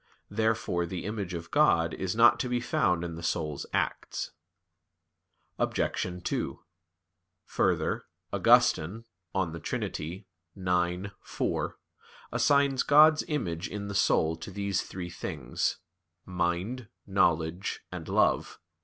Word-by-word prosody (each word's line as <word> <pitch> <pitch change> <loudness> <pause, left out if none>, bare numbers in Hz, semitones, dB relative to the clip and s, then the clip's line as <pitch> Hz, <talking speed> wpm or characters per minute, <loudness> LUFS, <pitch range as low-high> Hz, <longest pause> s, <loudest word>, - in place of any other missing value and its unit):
Therefore 110 -5 0
the 90 0 -5
image 100 -4 -3
of 85 0 -7
God 85 - +4
is 95 +1 -2
not 120 +1 +6
to 125 - -1
be 125 0 +1
found 90 -7 +1
in 85 -1 -4
the 85 - -7
soul's 80 -3 -2
acts. - - -2 1.3
Obj. 90 -1 -1
2: - - -2 0.9
Further, - - 0 0.3
Augustine 100 +9 +4 0.3
(De 85 -4 -1
Trin. - - -3
ix, 90 +1 -3 0.2
4) - - -2 0.5
assigns 140 -2 +3
God's 155 +1 +6
image 90 - -2
in 100 -1 -5
the - - -4
soul 80 -4 +3
to - - -8
these 100 0 -1
three 90 -2 -6
things 70 -7 -2 0.5
mind, 90 +7 -2 0.2
knowledge, 85 -2 +1
and - - -6
love. - - +2
90 Hz, 115 wpm, -29 LUFS, 85-110 Hz, 1.3 s, not